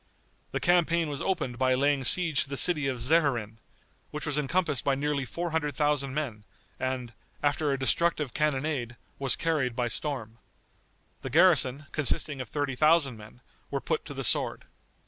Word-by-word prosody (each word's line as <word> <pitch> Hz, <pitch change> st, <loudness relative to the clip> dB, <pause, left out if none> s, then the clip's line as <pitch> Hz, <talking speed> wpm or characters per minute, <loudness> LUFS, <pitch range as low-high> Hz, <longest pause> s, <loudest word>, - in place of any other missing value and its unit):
The -, -, -2 dB
campaign 170 Hz, -2 st, +2 dB
was 145 Hz, -2 st, -5 dB
opened 130 Hz, -10 st, -2 dB
by 130 Hz, -1 st, +3 dB
laying 140 Hz, +1 st, +1 dB
siege 165 Hz, -4 st, +4 dB
to -, -, -17 dB
the 140 Hz, -, -4 dB
city 150 Hz, -4 st, +4 dB
Czeherin, 125 Hz, -4 st, 0 dB, 0.5 s
which 150 Hz, 0 st, -6 dB
was 150 Hz, -3 st, -1 dB
encompassed 150 Hz, 0 st, 0 dB
by 140 Hz, -, +1 dB
nearly 140 Hz, -1 st, -1 dB
four 170 Hz, +6 st, -4 dB
hundred 150 Hz, -2 st, -1 dB
thousand 145 Hz, -3 st, 0 dB
men, 125 Hz, -9 st, -3 dB, 0.4 s
and, 130 Hz, -2 st, -3 dB, 0.3 s
after 145 Hz, 0 st, +1 dB
a 135 Hz, -, 0 dB
destructive 150 Hz, 0 st, 0 dB
cannonade, 140 Hz, -4 st, -1 dB, 0.2 s
was 135 Hz, -2 st, 0 dB
carried 150 Hz, -7 st, -1 dB
by 120 Hz, -1 st, -1 dB
storm. 115 Hz, -3 st, -4 dB, 0.8 s
The -, -, -5 dB
garrison, 135 Hz, +4 st, +4 dB
consisting 145 Hz, -1 st, 0 dB
of 130 Hz, -, -8 dB
thirty 145 Hz, -2 st, -2 dB
thousand 150 Hz, -1 st, +3 dB
men, 110 Hz, +3 st, -14 dB, 0.3 s
were -, -, -2 dB
put -, -, -2 dB
to -, -, -8 dB
the -, -, -4 dB
sword. -, -, +1 dB
140 Hz, 165 wpm, -28 LUFS, 130-155 Hz, 0.8 s, siege